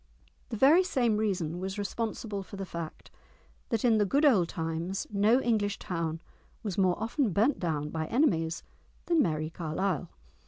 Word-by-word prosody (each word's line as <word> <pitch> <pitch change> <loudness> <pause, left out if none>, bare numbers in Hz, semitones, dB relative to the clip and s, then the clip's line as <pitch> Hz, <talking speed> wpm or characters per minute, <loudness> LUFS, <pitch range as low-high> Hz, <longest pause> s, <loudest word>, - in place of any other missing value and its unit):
The 225 - -4
very 305 - +6
same 240 - +1
reason 180 -6 -1
was 190 +2 -4
responsible 210 0 -3
for 195 - -10
the 195 0 -4
fact 170 -3 -7 0.6
that 230 -1 0
in 225 -3 +4
the - - +4
good 280 +9 +2
old 195 - +4
times 165 +2 -3
no 210 +5 +4
English 215 -5 0
town 165 -2 -3 0.4
was 200 -5 -3
more 185 -1 +2
often 230 +3 0
burnt 225 - +2
down 150 -4 -2
by 160 -1 -3
enemies 170 - +1 0.4
than 335 -3 +3
"Merrie 155 - -1
Carlisle." 170 +1 -2
200 Hz, 160 wpm, -29 LUFS, 165-230 Hz, 0.6 s, very